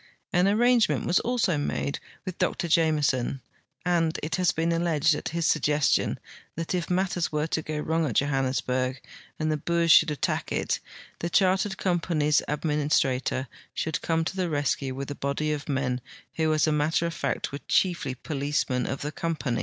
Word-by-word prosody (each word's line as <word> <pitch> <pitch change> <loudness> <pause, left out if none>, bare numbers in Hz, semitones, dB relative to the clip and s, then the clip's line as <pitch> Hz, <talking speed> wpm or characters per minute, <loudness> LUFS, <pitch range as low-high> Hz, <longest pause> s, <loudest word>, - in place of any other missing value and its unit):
An 180 +1 +4
arrangement 235 +2 +3
was 175 - +3
also 230 -10 +1
made 140 0 -2 0.3
with 185 -2 -6
Dr 170 - 0
Jame 160 -2 +3
son, 130 0 0 0.5
and 165 -3 +1
it 155 +1 -1
lias 180 - +3
been 165 +1 0
alleged 165 -2 +2
at 150 - -3
his 170 0 -2
suggestion, 150 -2 +2 0.4
that 165 +2 -3
if 175 -2 -2
matters 180 -1 0
were 150 0 0
to 160 0 -1
go 155 0 -4
wrong 160 +1 0
at 120 - -3
Johannesburg 130 -2 0 0.4
and 155 0 0
the 155 - 0
Boers 170 +2 +1
should 155 - +7
attack 150 - -2
it - - 0 0.4
the 170 - -2
Chartered 190 +1 +2
Company's 165 -5 +1
administrator 145 -4 0 0.3
should 160 0 -2
come 165 0 0
to 190 - -3
the 185 -2 -1
rescue 140 -3 -1
with 140 +1 -5
a - - -2
body 140 +2 -2
of 145 -1 -6
men 130 -2 -1 0.3
who 160 -1 +1
as 155 -1 +3
a 155 - +1
matter 150 +3 +1
of 170 - -2
fact - - -2
were 140 - -5
chiefly 170 -8 +1
]tolicemen 140 -3 -1
of 135 - -3
the 150 - -3
compain'. 155 -8 -2
155 Hz, 175 wpm, -26 LUFS, 140-170 Hz, 0.5 s, should